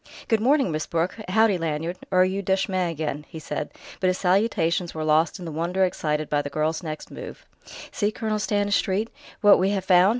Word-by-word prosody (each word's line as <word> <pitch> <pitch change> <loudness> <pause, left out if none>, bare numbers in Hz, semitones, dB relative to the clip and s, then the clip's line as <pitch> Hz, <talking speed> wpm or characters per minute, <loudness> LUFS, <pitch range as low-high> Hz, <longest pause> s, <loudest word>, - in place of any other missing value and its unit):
"Good 225 -2 +2
morning, 265 - +3
Miss 155 0 -2
Brooke. 170 +2 -1
Howdy, 215 -1 +3
Lanyard 165 +2 -2
or 185 -1 +4
are - - +6
you 190 +2 -1
Duchemin 190 -2 0
again?" 150 -2 -3
he 165 - -9
said; 150 -1 -4 0.3
but 185 - +1
his 185 0 +2
salutations 180 -3 +1
were 155 - -3
lost 155 +3 +2
in 180 - -8
the 165 - -5
wonder 175 +5 +1
excited 155 -4 -1
by 145 -1 +1
the 145 - -5
girl's 155 +3 -1
next 155 -3 -6
move. - - -9 0.5
"See, 205 - 0
Colonel 215 -1 -2
Stanistreet, 205 +1 0 0.3
what 205 -1 +7
we 190 +2 +2
have 195 -2 -1
found!" 180 0 +6
180 Hz, 200 wpm, -24 LUFS, 160-200 Hz, 0.5 s, what